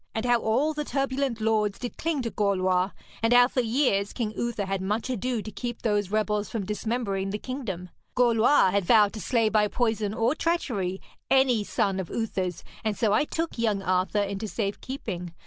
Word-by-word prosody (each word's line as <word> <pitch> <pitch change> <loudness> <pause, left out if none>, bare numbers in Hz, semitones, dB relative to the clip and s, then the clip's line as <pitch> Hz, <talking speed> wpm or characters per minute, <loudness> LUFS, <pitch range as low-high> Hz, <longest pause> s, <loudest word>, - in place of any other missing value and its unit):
And 220 +1 -1
how 240 -1 +4
all 270 +8 +1
the 300 0 -2
turbulent 270 -3 -1
lords 215 -2 +1
did 245 - -6
cling 310 -5 -1
to 230 - -3
Gorlois, 185 -2 +1 0.3
and 225 +1 +3
how 245 0 +7
for 255 - 0
years 225 -4 +1
King 225 -4 -2
Uther 235 -4 -2
had 195 -1 -2
much 210 +6 -1
ado 245 -1 -2
to 215 - -7
keep 240 +2 -5
those 205 -3 +1
rebels 210 0 0
from 215 -4 -3
dismembering 210 -2 -2
the 205 - -2
kingdom. 210 -8 -5 0.3
Gorlois 235 -3 +4
had 200 +1 +1
vowed 210 +2 +5
to 215 - -6
slay 230 -4 +2
by 215 -1 +3
poison 220 -2 0
or 230 +4 +2
treachery 235 - -1 0.3
any 260 -5 +4
son 195 -1 0
of 185 - -4
Uther's, 185 -6 -2 0.2
and 215 -2 -1
so 220 -4 +2
I 255 - +3
took 325 -4 -3
young 210 -4 +1
Arthur 185 +3 +1
into 200 +2 -4
safe 200 -1 -3
keeping. 180 -10 -5
220 Hz, 190 wpm, -26 LUFS, 200-245 Hz, 0.3 s, how